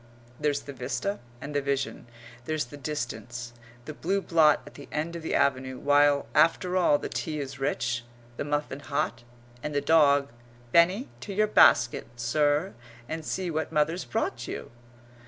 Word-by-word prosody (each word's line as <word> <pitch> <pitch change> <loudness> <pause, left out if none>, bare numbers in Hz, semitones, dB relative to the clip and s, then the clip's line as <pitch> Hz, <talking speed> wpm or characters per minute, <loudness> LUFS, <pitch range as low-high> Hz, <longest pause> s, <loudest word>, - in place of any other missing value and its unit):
There's 150 -1 0
the 140 - -9
vista 135 +11 -3 0.2
and 145 +3 -7
the 145 - +1
vision 140 -3 -2 0.4
there's 155 +1 -1
the - - -11
distance 120 -4 -5 0.3
the 155 - -6
blue 190 +6 0
blot 165 -5 +4
at - - -12
the 145 - -12
end 160 +3 -2
of 170 - -5
the 160 - -2
avenue, 130 -1 +1
while, 145 0 +4
after 165 +4 +3
all, 175 -5 +4
the - - -5
tea 155 -2 -3
is 135 -1 -6
rich, 120 -4 -1 0.3
the - - -3
muffin 145 -1 -2
hot, 140 -5 -2 0.4
and 150 +2 -4
the - - +3
dog 140 -3 +4 0.4
"Benny, 180 - +4
to 200 - -6
your 215 +1 +4
basket, 120 - +5
sir, 145 +8 +1 0.3
and 160 0 -4
see 180 +2 -2
what 160 0 -2
mother's 160 +3 +1
brought 120 - -2
you!" - - -6
145 Hz, 165 wpm, -27 LUFS, 135-160 Hz, 0.4 s, basket